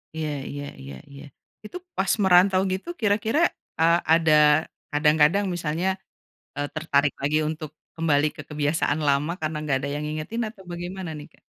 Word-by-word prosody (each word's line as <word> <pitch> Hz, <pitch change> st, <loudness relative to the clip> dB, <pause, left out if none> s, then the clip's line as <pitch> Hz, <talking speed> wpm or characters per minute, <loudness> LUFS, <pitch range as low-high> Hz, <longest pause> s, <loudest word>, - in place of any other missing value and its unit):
Iya 155 Hz, -1 st, -2 dB, 0.2 s
iya 145 Hz, 0 st, -6 dB, 0.2 s
iya 70 Hz, 0 st, -9 dB, 0.2 s
iya, 140 Hz, +1 st, -11 dB, 0.4 s
itu 285 Hz, -, -7 dB, 0.2 s
pas 190 Hz, 0 st, +1 dB
merantau 185 Hz, +1 st, +5 dB
gitu 190 Hz, -, -5 dB
kira-kira, 220 Hz, +5 st, +1 dB, 0.4 s
eee, 165 Hz, +1 st, +5 dB, 0.2 s
ada 160 Hz, -2 st, +4 dB, 0.6 s
kadang-kadang 150 Hz, +6 st, +3 dB
misalnya, 170 Hz, +1 st, -2 dB, 0.7 s
eee, 145 Hz, 0 st, -2 dB
tertarik 145 Hz, -2 st, +1 dB
lagi 150 Hz, +2 st, +2 dB
untuk 155 Hz, -1 st, -5 dB, 0.3 s
kembali 155 Hz, -2 st, +2 dB
ke -, -, -7 dB
kebiasaan 150 Hz, 0 st, 0 dB
lama 140 Hz, +4 st, +2 dB
karena 155 Hz, 0 st, -2 dB
nggak 145 Hz, -3 st, 0 dB
ada 140 Hz, -, -4 dB
yang 150 Hz, -, -3 dB
ngingetin 155 Hz, +10 st, -3 dB
atau 210 Hz, -3 st, -14 dB
bagaimana 175 Hz, +1 st, -5 dB
nih 145 Hz, -, -9 dB
Kak? -, -, -26 dB
155 Hz, 155 wpm, -24 LUFS, 150-180 Hz, 0.7 s, merantau